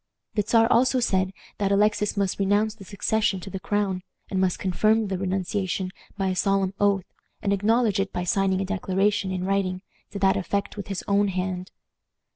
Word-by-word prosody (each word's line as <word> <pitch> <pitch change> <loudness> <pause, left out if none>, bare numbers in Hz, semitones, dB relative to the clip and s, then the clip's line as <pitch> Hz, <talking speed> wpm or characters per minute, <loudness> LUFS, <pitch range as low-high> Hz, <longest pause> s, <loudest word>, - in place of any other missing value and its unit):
The 210 - +2
Czar 225 +2 +4
also 255 +1 +4
said 190 -5 +1 0.3
that 200 -1 +1
Alexis 210 0 +2
must 200 -1 0
renounce 205 +2 +2
the 220 -3 -13
succession 200 0 0
to 195 - -8
the 190 - -4
crown, 200 -1 -1 0.3
and 190 -1 +1
must 185 -2 +1
confirm 215 +3 +2
the 190 - -1
renunciation 190 +1 -1 0.3
by 195 -1 0
a 185 - -1
solemn 195 0 +1
oath, 200 -2 +2 0.4
and 200 - +2
acknowledge 215 +1 +2
it 195 0 -1
by 180 - -2
signing 190 +1 +1
a - - -1
declaration, 195 +1 0
in 185 -1 -2
writing, 190 -1 0 0.3
to - - -6
that 195 -1 +3
effect 200 +2 -2
with 205 - -6
his 195 -2 -4
own 200 0 +3
hand. 185 -1 -3
195 Hz, 185 wpm, -25 LUFS, 190-205 Hz, 0.4 s, Czar